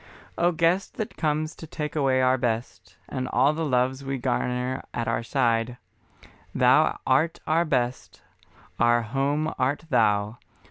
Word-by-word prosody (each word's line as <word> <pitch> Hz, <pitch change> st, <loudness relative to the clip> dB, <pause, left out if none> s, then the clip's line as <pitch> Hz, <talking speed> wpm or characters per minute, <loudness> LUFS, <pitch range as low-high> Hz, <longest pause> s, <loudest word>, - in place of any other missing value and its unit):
O 175 Hz, +1 st, +2 dB
Guest 170 Hz, +3 st, +1 dB
that 215 Hz, -, -4 dB
comes 155 Hz, 0 st, -1 dB
to 160 Hz, -, -11 dB
take 150 Hz, 0 st, -5 dB
away 135 Hz, -3 st, +2 dB
our 130 Hz, 0 st, +4 dB
best, 110 Hz, -6 st, -3 dB
And 130 Hz, -2 st, -4 dB
all 140 Hz, +4 st, +3 dB
the 165 Hz, +1 st, -3 dB
loves 130 Hz, -1 st, 0 dB
we 135 Hz, 0 st, -3 dB
garner 125 Hz, 0 st, -1 dB
at 120 Hz, +1 st, -2 dB
our -, -, 0 dB
side, 115 Hz, -1 st, 0 dB, 0.8 s
Thou -, -, +4 dB
art 150 Hz, +6 st, +2 dB
our 165 Hz, +2 st, +2 dB
Best, 125 Hz, -4 st, -2 dB, 0.6 s
our 120 Hz, 0 st, +3 dB
Home 140 Hz, +6 st, -1 dB
art 140 Hz, +5 st, 0 dB
Thou. 105 Hz, +1 st, +2 dB
130 Hz, 145 wpm, -25 LUFS, 120-150 Hz, 0.8 s, our